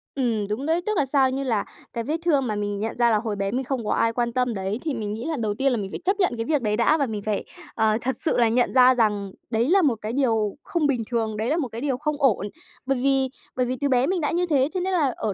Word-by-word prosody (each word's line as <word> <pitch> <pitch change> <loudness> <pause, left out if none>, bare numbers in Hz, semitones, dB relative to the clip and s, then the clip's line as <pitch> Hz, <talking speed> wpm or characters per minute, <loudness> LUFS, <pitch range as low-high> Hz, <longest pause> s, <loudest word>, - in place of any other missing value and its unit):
Ừm, 230 -6 0
đúng 230 +7 -3
đấy. 330 +2 +1
Tức 430 -2 0
là 285 - +3
sao? 265 -1 +3
Như 270 +1 -2
là 225 -6 0 0.3
cái 230 -1 -2
vết 310 +5 -1
thương 285 -6 +2
mà 215 - -1
mình 205 -1 -2
nhận 220 +3 -3
ra 240 -1 +4
là 215 - +3
hồi 215 -1 -3
bé 195 0 -2
mình 260 +2 -1
không 255 -4 -3
có - - -1
ai 230 0 +2
quan 235 0 -1
tâm 250 -1 0
đấy 195 +3 -3
thì 305 -4 -1
mình 210 -3 -3
nghĩ 225 +3 -5
là 320 -1 -1
đầu 215 -3 -1
tiên 270 +4 +1
là 245 - 0
mình 195 -3 -4
phải - - -5
chấp 390 +2 +1
nhận 370 -10 +2
cái 225 - -2
việc 300 -3 +1
đấy 210 -2 0
đã, 240 +7 +3
và 285 - +1
mình 215 -4 -4
phải, 210 -2 -1 0.3
ờ, 220 -1 +2
thật 260 -1 -1
sự - - 0
là 235 -2 +4
nhận 245 +2 +1
ra 255 0 +7
rằng 205 -4 0 0.2
đấy 230 +3 +1
là 390 +2 +5
một 270 -8 +2
cái 215 +2 -4
điều 225 -6 +1
không 325 -4 0
bình 250 -5 0
thường, 220 -3 -1
đấy 220 - -1
là 315 - +1
một 280 -7 -1
cái 230 +1 -7
điều 275 -3 -1
không 300 +2 -2
ổn, 210 -7 +2 0.4
bởi 270 0 +1
vì 270 -1 +3 0.3
bởi 255 -1 +1
vì 255 - -2
từ 285 - +1
bé 255 0 +3
mình 365 -2 0
đã 295 - 0
như 355 +1 +1
thế, 280 -4 +2
thế 370 - -1
nên 375 +1 -1
là 290 -8 +2
ở 215 - -2
245 Hz, 310 wpm, -24 LUFS, 220-280 Hz, 0.4 s, ra